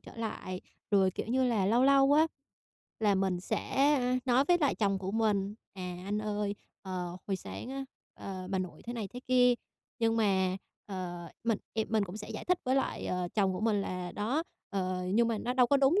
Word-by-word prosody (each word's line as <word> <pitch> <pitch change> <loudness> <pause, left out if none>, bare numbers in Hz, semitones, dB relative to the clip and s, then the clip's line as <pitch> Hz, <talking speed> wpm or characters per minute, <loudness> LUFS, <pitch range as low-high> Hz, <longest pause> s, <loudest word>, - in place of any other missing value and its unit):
trở - - -13
lại. 210 -5 -4 0.3
Rồi, 195 -2 +4
kiểu - - -4
như 255 +3 +2
là, 220 -6 +2
lâu 235 +4 +4
lâu 275 0 +6
á 310 +2 +6 0.7
là 210 -2 +4
mình 190 -2 +1
sẽ, 275 +9 +2
ơ, 250 0 +1
nói 255 +1 +4
với 350 - +5
lại 285 - +3
chồng 195 -2 +1
của 190 0 -3
mình: 210 -2 +1 0.2
"À, 180 -2 -5
anh 205 +1 0
ơi, 205 -1 -1 0.3
ờ, 180 -2 -4
hồi 195 -2 0
sáng 240 - -7
á, 270 0 -4 0.3
ờ, 185 -2 -6
bà 190 - +1
nội 185 -1 -5
thế 240 - -4
này 220 -5 -4
thế 245 - -8
kia", 250 -1 +6 0.4
nhưng 225 0 +2
mà, 190 -3 +2 0.3
ờ, 175 -3 -5 0.2
mình, 225 -3 +2 0.2
ề, 220 -1 +1
mình 220 -2 +1
cũng 185 +2 -7
sẽ 210 - -7
giải - - -5
thích 360 0 +2
với 260 +1 +2
lại, 270 - -1
ờ, 180 -1 -1
chồng 195 -3 +3
của 185 - -4
mình 215 -2 +2
là 180 -2 -4
"Đó, 245 +10 0 0.3
ờ, 185 -2 -1
nhưng 235 +1 +4
mà 225 - 0
nó 245 - -1
đâu 250 -2 +5
có 280 - +4
đúng 275 +8 +4
210 Hz, 220 wpm, -31 LUFS, 190-245 Hz, 0.7 s, lâu